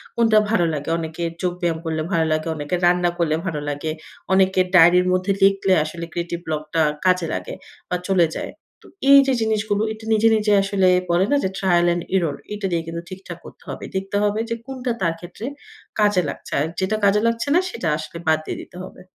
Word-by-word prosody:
কোনটা 225 -2 +4
ভালো 195 -6 +2
লাগে। 145 0 -4
অনেকের 165 +1 -4
যোগ 180 -1 0
ব্যায়াম 170 -2 0
করলে 160 -1 -2
ভালো 165 -2 +2
লাগে। 155 +1 -2
অনেকের 150 +4 -2
রান্না 180 0 +3
করলে 165 -3 +1
ভালো 165 -5 -2
লাগে। 145 +2 -3 0.4
অনেকের 190 -1 +3
ডায়রির 180 +1 +7
মধ্যে 185 +2 0
লিখলে 195 -1 +4
আসলে 170 +2 -6
ক্রিয়েটিভ 170 0 -4
ব্লকটা 155 +1 -1 0.2
কাজে 180 -2 +3
লাগে 90 0 -4 0.4
বা - - 0
চলে 180 -3 +4
যায়। - - -5 0.3
তো - - -16 0.2
এই 280 - +10
যে 270 - +3
জিনিসগুলো 215 -1 0
এটা 220 0 -12
নিজে, 220 +1 +4
নিজে 210 -1 +1
আসলে 195 -1 +1 0.2
বলে 175 +2 +3
না - - +4
যে 190 - +1
trial 175 -3 +2
and 175 -1 -3
error? 165 -6 +1 0.2
এটা 210 -1 -4
দিয়ে 170 -1 0
কিন্তু 170 0 -5
ঠিকঠাক 185 -2 -9
করতে - - -14
হবে। - - -6
দেখতে 195 +1 -3
হবে 210 +1 +1
যে 230 - -1
কোনটা 260 -2 -4
তার 170 -3 +1
ক্ষেত্রে 180 +6 -9 0.5
কাজে 205 -3 +3
লাগছে। - - -9
আর 150 - 0
যেটা 190 +3 0
কাজে 200 +1 +4
লাগছে 230 +1 -1
না - - +6
সেটা 180 - -4
আসলে 155 +2 -8
বাদ 155 0 +4
দিয়ে - - -5
দিতে 180 - -13
হবে। 185 - -11
180 Hz, 205 wpm, -21 LUFS, 165-205 Hz, 0.5 s, এই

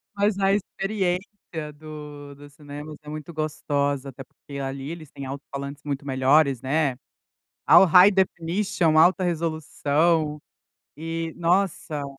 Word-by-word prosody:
Mas 200 0 +1
a 195 0 +3
experiência 195 -2 -1 0.5
do 150 -2 -10
do 145 0 -14
cinema 145 0 -9
é 150 - -11
muito 155 +2 -7
gostosa, 145 -3 -1
até 135 +1 -9
porque 140 +2 -11
ali 135 +2 -4
eles 160 -4 -9
têm 140 - -8
alto-falantes 140 +1 -7
muito 140 -1 -4
melhores, 135 0 +3
né, 140 -1 +1 0.7
all 190 - +8
high 180 +4 +8
definition, 175 -3 +1
alta 180 +3 +5
resolução 160 -1 0 0.6
e, 165 +1 -4
nossa 170 -4 0
155 Hz, 125 wpm, -24 LUFS, 140-170 Hz, 0.7 s, all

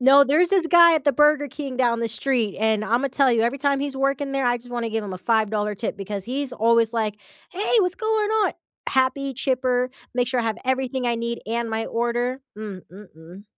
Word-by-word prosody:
No, 275 +2 +7
there's 315 +6 +3
this 375 -4 +2
guy 340 -1 +7
at 305 - -1
the 285 - +3
Burger 295 +1 +3
King 270 -1 -6
down 235 -2 +1
the 230 - -1
street, 230 -2 -1
and 220 -1 +1
Imma 245 +5 0
tell 270 0 +2
you, 230 -1 +2
every 245 +4 0
time 280 0 +1
he's 280 -1 -4
working 275 +1 -1
there, 270 -2 0
I 245 0 +2
just 245 +1 -14
wanna 235 -2 -3
give 220 -1 -2
him 195 - -6
a 185 - -6
$5 210 0 0
tip, 200 -1 -4
because 195 0 -5
he's 265 +2 -3
always 230 0 +2
like, 215 -2 -1 0.3
"Hey, 415 +6 0
what's 360 -1 0
going 435 -1 0
on?" 435 -1 +2 0.4
Happy, 265 +1 0
chipper, 255 -1 0 0.2
make 245 0 +1
sure 250 0 0
I - - -2
have 225 -1 -2
everything 260 -1 -1
I 235 - +1
need 235 0 -4
and 230 +1 -2
my 220 0 -2
order. 240 +3 -1 0.2
Mm 200 -4 -7
mm 205 +1 -12
mm. 175 +5 -13
245 Hz, 225 wpm, -23 LUFS, 225-275 Hz, 0.4 s, No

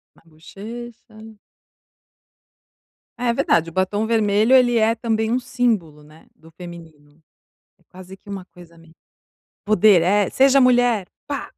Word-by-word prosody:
Na - - -25
bochecha. 220 +8 -12 2.0
É 245 -1 0
verdade, 165 -7 0
o - - -17
batom 195 +4 -1
vermelho 220 +1 +2
ele 245 -2 +4
é 225 +1 +2
também 225 -1 -2
um 245 - +1
símbolo, 220 -12 -2
né, 155 +2 -20
do 160 +1 -20
feminino. 160 -3 -14 0.6
É - - -33
quase 185 +1 -13
que 200 - -23
uma 195 -2 -7
coisa 170 -2 -18
meio. 165 -1 -20 0.7
Poder 205 -3 +4
é, 195 +2 +1
seja 275 +1 +3
mulher, 245 -6 +2 0.2
pá! 285 -2 -5
205 Hz, 135 wpm, -20 LUFS, 170-235 Hz, 2.0 s, ele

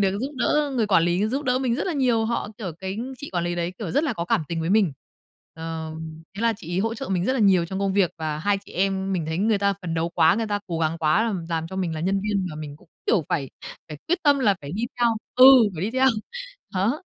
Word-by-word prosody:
được 195 0 +1
giúp 275 +3 -3
đỡ, 295 +2 +1
người 225 - +2
quản 190 -5 +4
lý 175 +5 +1
giúp 275 +5 -2
đỡ 255 -1 +2
mình 255 -3 0
rất 270 - -2
là 365 - 0
nhiều, 245 -6 +2
họ, 230 -2 -2
kiểu, 190 -7 -4
cái 190 +2 -4 0.2
chị 285 - -8
quản 175 -1 0
lý 175 0 -1
đấy, 175 +1 -2
kiểu, 200 -7 -4
rất 295 - +1
là 280 - 0
có 170 -5 -3
cảm 170 - +1
tình 165 -1 -2
với 165 +3 -1
mình. 200 -8 +3 0.6
Ờm, 160 0 -6
thế 220 - -4
là 230 - +3
chị 170 -1 -7
ấy 185 - +1
hỗ 225 +2 -1
trợ 220 - -6
mình 180 -2 0
rất 260 - +1
là 265 - -1
nhiều 190 -5 +4
trong 190 +3 -4
công 195 -1 0
việc, 195 -3 +3
và 155 -1 -3
hai 200 +5 +1
chị 200 - -16
em 195 +1 0
mình 170 -4 -1
thấy 160 +1 -2
người 210 +1 +2
ta 200 0 +1
phấn 165 -2 -3
đấu 165 +1 0
quá, 165 0 +4
người 225 0 -1
ta 205 -1 -1
cố 170 -3 -3
gắng 165 0 0
quá 155 +8 +3
làm 195 -7 -2
làm 165 -1 -2
cho 190 - -7
mình 175 -4 -1
là 155 - -4
nhân 195 +3 0
viên 200 -3 -1
mà 150 - -8
mình 145 -2 -7
cũng, - - -23 0.2
kiểu, 190 -9 +2
phải 135 -3 -1 0.4
phải 150 -2 -8
quyết 355 +3 +2
tâm 290 -3 +4
là 210 -7 +3
phải 140 +1 -7
đi 220 - -3 0.2
theo. 240 - +5 0.3
Ừ, 255 - +7 0.3
phải 165 - -4
đi 220 - -1
theo. 260 +1 +3 0.7
Đó. 225 - 0
190 Hz, 285 wpm, -24 LUFS, 165-225 Hz, 0.7 s, Ừ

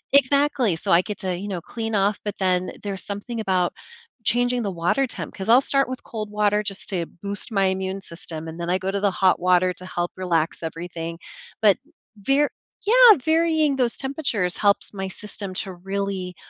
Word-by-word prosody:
Exactly, 280 - +4
so - - -2
I 170 - +6
get 210 +2 -6
to, 185 -2 -1
you 200 - -6
know, 185 - -2
clean 225 +5 -4
off, 200 +1 +2
but 205 - -4
then 185 -1 +1
there's 195 -2 -4
something 205 +4 -5
about 185 -4 +1 0.5
changing 245 +2 +2
the 205 - -1
water 175 +10 +1
temp. 235 - -7
'Cause 190 +3 -5
I'll 240 - +8
start 275 -1 +1
with 255 -1 -5
cold 215 -2 -5
water 210 0 +2
just 200 -1 -5
to 180 -4 -1 0.2
boost 200 +3 -3
my 195 -2 +2
immune 190 +1 -1
system, 165 -3 -7
and 160 +1 -8
then 170 0 -3
I 180 - +3
go 190 +1 -2
to 200 - -1
the 200 - +3
hot 185 0 +3
water 180 0 +3
to 185 - -11
help 175 -1 -2
relax 170 -4 0
everything, 165 0 -5 0.4
but, 205 -3 +5 0.4
var 275 +8 +2 0.4
Yeah, 475 0 +8
varying 315 -2 +2
those 250 -3 0
temperatures 265 - -1
helps 205 0 +2
my 190 -1 -4
system 200 -1 -4
to 190 0 -3
really 190 0 -4
200 Hz, 195 wpm, -23 LUFS, 180-235 Hz, 0.5 s, I'll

